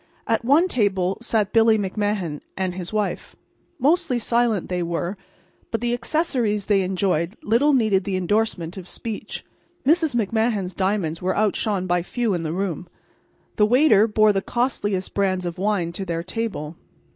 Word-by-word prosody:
At 225 0 0
one 290 +9 +4
table 195 - 0
sat 220 -4 0
Billy 225 -1 +5
McMahan 200 -5 -2 0.2
and 185 -1 -1
his 180 -1 -5
wife. 210 -2 -2 0.4
Mostly 305 0 +2
silent 235 -4 +1
they 180 -1 -2
were, 170 +2 -2 0.5
but 225 - -1
the 240 0 -1
accessories 240 - 0
they 200 -2 +3
enjoyed 185 -1 -1
little 235 +8 +3
needed 215 -8 +3
the 195 -1 -2
indorsement 185 -2 -1
of 185 -2 -8
speech. 220 +1 -6 0.4
Mrs. 315 -2 +3
McMahan's 220 -3 0
diamonds 185 -4 -1
were 185 +1 -1
outshone 205 -2 0
by 175 -1 +1
few 230 +4 -1
in 175 - -1
the 160 -1 -3
room. 180 -1 -3 0.7
The 210 - +4
waiter 235 -4 +5
bore 215 -1 +4
the 195 - 0
costliest 205 -6 -1
brands 185 -2 0
of 175 +1 -5
wine 195 -4 0
to 185 +3 -5
their 170 -2 -3
table. 185 -8 -4
205 Hz, 155 wpm, -23 LUFS, 185-230 Hz, 0.7 s, Billy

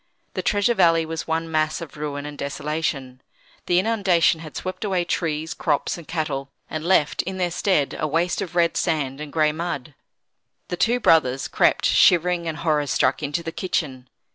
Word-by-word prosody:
The 185 - -2
Treasure 205 +5 +2
Valley 165 -5 +4
was 160 0 -5
one 165 0 -2
mass 155 -1 +1
of 165 -5 -9
ruin 145 -1 -4
and 150 0 -7
desolation. 140 -3 -3 0.5
The 175 - +3
inundation 190 -5 +3
had 155 -2 -10
swept 185 +1 -5
away 185 -4 0
trees, 160 -2 -2
crops, 145 -4 -1
and 170 -3 -11
cattle, 145 -4 -3 0.2
and 155 0 -5
left, 170 -4 +2
in 190 +1 -5
their 180 -2 0
stead, 170 -5 +1
a 155 - 0
waste 170 +6 0
of 175 -3 -6
red 170 -1 +2
sand 150 -5 -1
and 150 -1 -7
gray 155 -1 +2
mud. 150 -3 -4 0.8
The - - -2
two 235 +7 +2
brothers 135 - +3
crept, - - +2
shivering 175 0 +4
and 160 -1 -3
horror 150 -2 0
struck, 130 - +1
into 150 +3 -2
the 165 - -4
kitchen. 135 -9 -3
160 Hz, 180 wpm, -23 LUFS, 150-175 Hz, 0.8 s, Valley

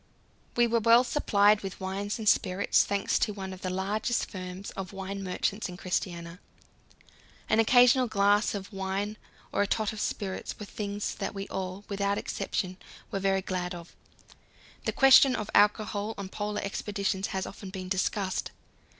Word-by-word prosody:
We 240 - +5
were 235 0 +2
well 230 +2 +6
supplied 210 -6 +3
with 195 -1 -6
wines 195 +3 -3
and 220 -2 -5
spirits, 200 -3 +3
thanks 200 +3 0
to 210 - 0
one 190 -1 -5
of 185 - -11
the 185 - -2
largest 205 +6 -1
firms 185 0 -6
of 195 0 -7
wine 195 +1 -5
merchants 195 +2 -2
in 180 - -8
Christiania. 175 -1 -3 1.1
An 215 - +3
occasional 245 +2 +6
glass 205 0 +3
of 200 +1 -7
wine 195 +2 -2 0.4
or - - +1
a 205 - +2
tot 215 +1 0
of 215 - -7
spirits 195 -2 -3
were 210 - -7
things 205 0 -4
that 200 0 -4
we 195 +1 -5
all, 190 +1 -5
without 200 0 0
exception, 185 -1 -3 0.3
were 195 - -1
very 195 0 +1
glad 180 -1 -3
of. 170 0 -11 0.9
The - - +1
question 270 0 +7
of 215 0 -4
alcohol 210 +1 +2
on 200 -2 -6
Polar 210 +1 -3
expeditions 200 -1 -2
has 190 -1 -3
often 195 -1 -8
been 185 -1 -6
discussed. 190 +1 -1
200 Hz, 165 wpm, -29 LUFS, 190-210 Hz, 1.1 s, question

